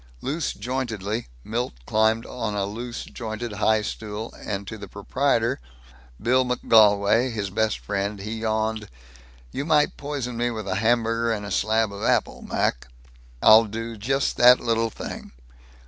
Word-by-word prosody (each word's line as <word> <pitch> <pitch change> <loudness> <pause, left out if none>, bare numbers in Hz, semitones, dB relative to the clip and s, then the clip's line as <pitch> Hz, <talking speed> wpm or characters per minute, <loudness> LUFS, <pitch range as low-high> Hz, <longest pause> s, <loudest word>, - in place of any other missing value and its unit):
Loose 155 +2 -2
jointedly 115 -4 -3 0.2
Milt 120 - -2
climbed 110 - +2
a 105 -5 -2
loose 115 +4 -5
jointed 115 0 -6
high 110 +1 +2
stool 110 +1 -5
and 100 -1 -5
to - - -6
the 100 -2 -9
proprietor, 115 - 0 0.6
Bill 130 +4 +3
McGolwey, 115 -1 +4
his 100 -4 -3
best 110 +1 +1
friend, 100 0 -3
he 110 +3 -5
yawned, 110 -1 -1 0.6
"You 140 - -3
might 150 -1 +2
poison 140 -5 -4
me 120 +1 +1
with 110 -3 -5
a 95 - -1
hamburger 115 +1 +1
and 105 -2 -2
a 100 - -6
slab 110 +1 +1
of 100 - -8
apple, - - +1
Mac." - - -1 0.6
"I'll 110 +1 +8
just 115 +4 -2
do - - -2
that 125 +1 +8
little 115 -1 0
thing. - - -8
110 Hz, 145 wpm, -24 LUFS, 105-120 Hz, 0.6 s, I'll